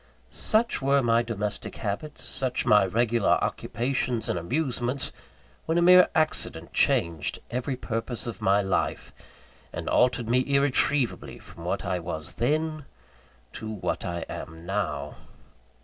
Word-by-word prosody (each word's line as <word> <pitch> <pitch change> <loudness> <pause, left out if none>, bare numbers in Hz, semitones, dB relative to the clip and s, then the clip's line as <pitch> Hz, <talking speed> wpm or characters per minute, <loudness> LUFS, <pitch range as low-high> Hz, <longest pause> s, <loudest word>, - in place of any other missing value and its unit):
Such 225 -4 +1
were 140 0 +3
my 115 0 +3
domestic 105 -3 -4
habits, 110 +8 -4
such 130 -2 -2
my 105 -2 +5
regular 115 +2 +2
occupations 125 0 -1
and 90 - -1
amusements, 125 - -1 0.6
when 160 +1 +1
a - - +4
mere 180 +1 +8
accident 155 -2 0
changed 85 -2 +2
every 130 +2 -2
purpose 115 -1 -3
of 115 -5 -6
my 100 +1 +3
life, 95 - -1 0.6
and - - -6
altered 125 -2 +2
me 120 +2 +3
irretrievably 140 -1 +1
from - - -12
what - - -2
I 90 - -1
was 85 0 -5
then, 155 - -1 0.7
to 110 - -6
what 105 -4 -3
I 85 0 -3
am 80 +1 -8
now. 100 +1 -3
120 Hz, 135 wpm, -26 LUFS, 100-140 Hz, 0.7 s, mere